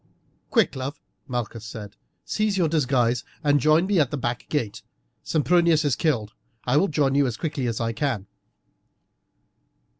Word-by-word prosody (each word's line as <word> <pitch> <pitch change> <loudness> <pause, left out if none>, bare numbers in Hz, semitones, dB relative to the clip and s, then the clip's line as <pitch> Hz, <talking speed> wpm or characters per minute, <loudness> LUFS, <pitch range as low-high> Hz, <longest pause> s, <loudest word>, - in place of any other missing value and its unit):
"Quick, - - +2
love!" 135 +2 -5 0.3
Malchus 120 -3 -4
said; 105 -2 -8 0.3
"seize 215 -2 0
your 175 -3 +3
disguise 125 -6 +1 0.2
and 145 -1 +4
join 155 +5 +4
me 195 -2 +2
at 145 -5 +3
the 145 - -3
back 120 -2 -3
gate. 120 -9 -2 0.4
Sempronius 165 0 +3
is 145 - +2
killed; 115 -9 0 0.3
I 125 - +1
will 195 - +4
join 145 -4 +1
you 140 -1 +3
as 115 -3 -3
quickly 145 -4 -2
as 115 -2 -2
I 115 -1 -1
can." 115 -5 -1
140 Hz, 155 wpm, -24 LUFS, 120-155 Hz, 0.4 s, and